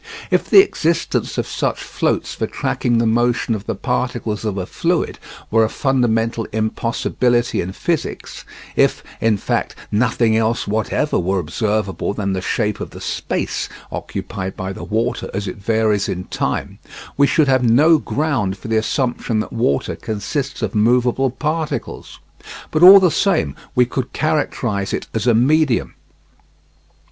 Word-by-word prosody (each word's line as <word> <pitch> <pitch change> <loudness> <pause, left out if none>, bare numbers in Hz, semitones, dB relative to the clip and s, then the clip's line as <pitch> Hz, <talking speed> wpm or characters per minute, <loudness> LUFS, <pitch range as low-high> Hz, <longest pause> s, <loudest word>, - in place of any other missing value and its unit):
If - - +1
the 390 - +9
existence 170 - -1
of - - 0
such - - -2
floats - - -1
for - - -2
tracking 120 -1 -1
the 115 - +2
motion 120 0 +1
of 105 -1 -5
the 115 - -1
particles 120 -2 -2
of 105 -3 -2
a 95 - -2
fluid - - -1 0.3
were 115 +1 +4
a 110 - +1
fundamental 115 -4 0
impossibility 115 +2 0
in 90 - -4
physics 160 - -3 0.3
if, - - +2 0.2
in 110 -2 +3
fact, - - -2 0.2
nothing 110 0 +2
else 115 +1 0
whatever 110 +7 0
were 95 +2 0
observable 100 +3 -1
than 100 -2 -1
the 95 - -2
shape 105 +2 -1
of - - -5
the - - -11
space - - -3 0.2
occupied 95 0 -5
by 95 +1 -4
the - - -8
water 115 +3 -2
as 100 0 -2
it - - -5
varies 110 0 +1
in 90 0 -3
time, - - -3 0.4
we 140 0 +4
should 155 0 +3
have 130 -1 +3
no 150 +8 +5
ground 135 -12 -1
for 110 - -9
the 110 - +2
assumption 120 0 -1
that 110 - -4
water 115 - 0
consists 130 +5 -4
of 105 - -2
movable 125 +4 +2
particles. 155 +4 -4 0.5
But 155 - 0
all 190 +3 +11
the 180 -3 +3
same 80 - +1 0.2
we 125 - +5
could 125 +1 -4
characterise 125 -10 -1
it - - -5
as 110 +1 -1
a 120 - +5
medium. 140 +2 +2
115 Hz, 155 wpm, -19 LUFS, 105-130 Hz, 0.5 s, all